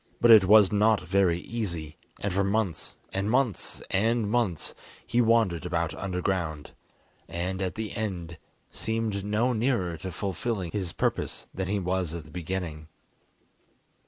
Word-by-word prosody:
But 120 - +6
it 110 -4 +9
was 105 0 +7
not 105 0 +3
very 90 -2 +2
easy, 85 -9 -4 0.3
and 100 -2 -1
for 100 +1 +2
months, 100 -4 -1 0.2
and 95 +2 -1
months, 125 -5 0
and 115 +3 +2
months, 110 -10 0 0.3
he 120 - +2
wandered 115 -7 +3
about 85 -2 -1
underground, 90 -5 -2 0.6
and, 90 +3 -3
at 95 0 -2
the 110 -2 -4
end, 90 -6 -4 0.3
seemed 110 -3 -2
no 110 +5 +1
nearer 110 -8 0
to 95 +4 -6
fulfilling 95 0 -3
his 95 -5 -2
purpose - - -2
than 95 0 -3
he 100 +2 0
was 90 -3 -1
at 85 -3 -6
the 75 - -14
beginning. 85 -3 -4
95 Hz, 145 wpm, -27 LUFS, 85-110 Hz, 0.6 s, it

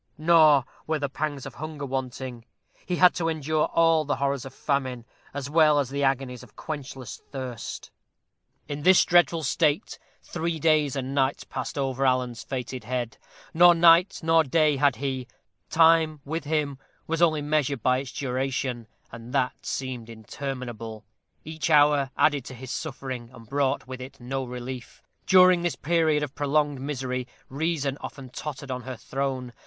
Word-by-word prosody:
Nor 155 -4 +5 0.2
were 155 0 +1
the 145 -2 -2
pangs 145 -1 -3
of 135 - -8
hunger 155 0 -6
wanting. 130 -2 -5 0.4
He 180 - 0
had 180 0 +6
to 165 -1 -1
endure 155 -1 0
all 165 -1 +3
the 145 0 -1
horrors 140 -1 -1
of 135 - -9
famine, 130 -4 -2 0.3
as 140 -1 -5
well 150 0 +4
as 135 -3 0
the 140 0 -2
agonies 135 -2 0
of 125 -4 -16
quenchless 135 -5 -7
thirst. 130 -4 -6 0.8
In 145 0 -5
this 185 +4 +6
dreadful 175 -2 +3
state 150 +1 0 0.2
three 170 -1 -3
days 155 -3 +2
and 135 0 -3
nights 135 0 +1
passed - - -6
over 135 -1 -1
Alan's 125 -3 +1
fated 125 -1 -5
head. 120 -1 -3 0.3
Nor 175 +1 +7
night 170 +3 +5
nor 165 0 +4
day 150 0 +2
had 140 -1 +3
he. 130 -2 -3 0.4
Time, 160 -2 +4
with 160 +2 -4
him, 145 -3 -1 0.3
was 165 +1 -2
only 155 -3 +3
measured 145 -4 0
by 130 0 +3
its 135 -2 -7
duration, 130 -2 -2 0.2
and 115 +2 -10
that 130 -2 -1
seemed 125 -4 -4
interminable. 115 -1 -6 0.4
Each 160 +1 -3
hour 145 -2 +5
added 145 -3 +3
to 130 - -8
his 130 +1 -8
suffering, 130 -6 -5
and 115 -3 -14
brought 140 +1 0
with 130 0 -8
it 135 +2 -10
no 130 +2 -3
relief. 125 0 -8 0.2
During 185 -1 +6
this 175 -1 -1
period 160 -2 +1
of 145 -2 -5
prolonged 145 -1 0
misery 130 -3 -3 0.2
reason 145 -1 -2
often 135 -2 -8
tottered 140 -1 -6
on 125 0 -3
her 130 0 -7
throne. 130 -2 -3
140 Hz, 160 wpm, -26 LUFS, 130-155 Hz, 0.8 s, Nor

